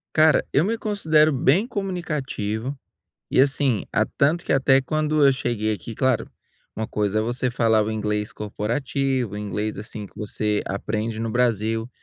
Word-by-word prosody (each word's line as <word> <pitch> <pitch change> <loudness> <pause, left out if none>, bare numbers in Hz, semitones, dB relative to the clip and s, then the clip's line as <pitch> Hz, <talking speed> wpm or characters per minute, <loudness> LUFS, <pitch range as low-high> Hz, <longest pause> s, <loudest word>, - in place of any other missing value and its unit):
Cara, 155 -1 +5
eu 145 - +4
me 225 +4 0
considero 160 -8 +3
bem 155 - +3
comunicativo 145 - -3 0.6
e, - - +3
assim, 135 -4 +2
a - - +3
tanto 155 +5 +1
que - - -3
até 135 0 +4
quando 155 +2 +1
eu 140 - +7
cheguei 115 -4 -1
aqui, 110 +1 -7
claro, 130 -3 +1 0.5
uma 110 - -2
coisa 105 0 0
é - - +1
você 120 +2 -1
falar 110 -3 +2
inglês 105 -1 -2
corporativo, 120 +2 -2
inglês 105 0 -3
assim 105 0 -7
que - - -17
você 105 0 -1
aprende 110 +3 -3
no 115 0 -2
Brasil. 115 -1 0
120 Hz, 155 wpm, -23 LUFS, 105-140 Hz, 0.6 s, eu